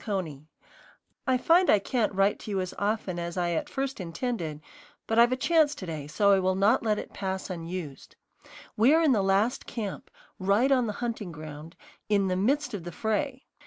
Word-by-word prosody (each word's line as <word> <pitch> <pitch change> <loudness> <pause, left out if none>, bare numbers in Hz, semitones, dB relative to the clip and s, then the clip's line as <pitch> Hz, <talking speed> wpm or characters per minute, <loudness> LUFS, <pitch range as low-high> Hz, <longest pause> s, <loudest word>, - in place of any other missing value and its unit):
CONEY, 165 -9 -4 0.8
I 260 -1 +3
find 340 +7 +4
I - - +7
can't 215 +3 0
write 195 +1 +2
to - - -9
you 195 -2 -1
as 185 -1 -3
often 200 -4 -1
as 170 +1 -5
I 175 -1 0
at 165 - -2
first 270 -2 -3
intended; 170 - -3 0.5
but 225 +1 +1
I've 240 +1 +6
a - - +2
chance 305 +2 +3
to 190 - -7
day, 155 -4 -5
so 200 +7 +3
I 195 - +5
will 185 0 +1
not 205 +6 +3
let 215 -2 +1
it - - -7
pass 190 -1 -4
unused. 165 -4 -7 0.6
We 245 +8 +5
are 330 - +3
in 305 - +4
the 215 -5 +3
last 195 +6 +1
camp, 210 -5 -5 0.3
right 200 +8 +2
on 250 -3 +3
the 210 - -2
hunting 225 -6 -4
ground, 155 +1 -9 0.3
in 200 -2 +2
the 185 - 0
"midst 275 +10 0
of 195 -5 -4
the 175 - -6
fray." 255 - -2
200 Hz, 200 wpm, -28 LUFS, 180-245 Hz, 0.8 s, I